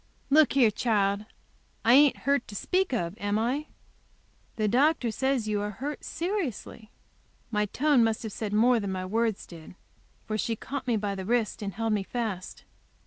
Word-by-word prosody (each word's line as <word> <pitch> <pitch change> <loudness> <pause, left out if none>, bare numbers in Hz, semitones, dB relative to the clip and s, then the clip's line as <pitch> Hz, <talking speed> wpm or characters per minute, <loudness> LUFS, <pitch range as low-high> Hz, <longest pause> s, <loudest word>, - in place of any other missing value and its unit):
"Look 305 0 +5
here, 250 -5 +5
child, 205 -2 0 0.6
I 235 - +6
ain't 285 0 +6
hurt 280 -3 +1
to 205 - -9
speak 370 - 0
of, 180 -7 -2
am 205 +1 0
I?" 260 +7 -1 0.9
"The 215 -1 0
doctor 260 +2 +2
says 265 -1 0
you 210 -1 0
are 205 - -2
hurt 275 +8 -6
seriously." 330 - -4 0.6
My 210 -1 +1
tone 280 +2 +3
must 225 0 0
have 220 - -5
said 215 -2 -4
more 235 +3 +4
than 200 -2 -3
my 185 -1 -3
words 220 +1 -1
did 170 0 -12 0.5
for 215 0 -3
she 230 - -1
caught 270 +4 -6
me 235 -2 +2
by 205 -1 -2
the 190 -1 -5
wrist 230 0 0
and 200 -2 -4
held 225 0 0
me 210 - +1
fast. 200 -3 -5
225 Hz, 180 wpm, -27 LUFS, 205-260 Hz, 0.9 s, I